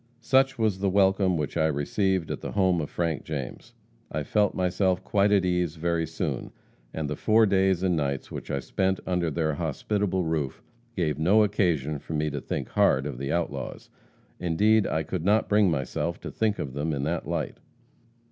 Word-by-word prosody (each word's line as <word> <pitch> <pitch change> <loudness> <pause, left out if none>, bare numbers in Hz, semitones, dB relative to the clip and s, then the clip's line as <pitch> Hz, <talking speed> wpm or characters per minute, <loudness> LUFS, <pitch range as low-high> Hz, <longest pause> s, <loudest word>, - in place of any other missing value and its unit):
"Such 135 +3 +3
was 110 -4 +1
the 100 0 +1
welcome 95 -1 +3
which 75 -2 -3
I 80 -1 +3
received 85 +4 0
at - - -4
the - - -5
home 95 -4 +2
of 75 - -4
Frank 85 -4 -2
James. 70 -5 -6 0.4
I 75 0 -2
felt 105 +6 +1
myself 95 0 +1
quite 100 0 +2
at 100 -2 +4
ease 90 -3 0
very 85 0 -1
soon, 80 -4 -3 0.4
and 80 -2 -3
the 75 - -3
four 110 +7 +4
days 95 -2 +2
and 90 -2 +2
nights 70 -3 -2
which - - -7
I 70 - -1
spent 95 +5 0
under 90 -2 0
their 80 0 0
hospitable 100 +4 -1
roof 80 -5 -2 0.3
gave 75 -5 -1
no 100 +7 +5
occasion 85 -8 0
for 80 - -8
me 75 0 0
to 70 -1 -4
think - - -4
hard 65 +1 +3
of 70 -4 -5
the 70 +1 -3
outlaws. 70 -6 -3 0.5
Indeed, 105 +5 +3
I 80 - 0
could 80 +2 -4
not 105 +4 +3
bring 105 -2 +4
myself 80 +3 -2
to - - -6
think 110 -2 0
of 65 - -4
them 75 +3 -2
in 70 -1 -2
that 80 +3 -2
light. - - -3
85 Hz, 190 wpm, -26 LUFS, 75-95 Hz, 0.5 s, no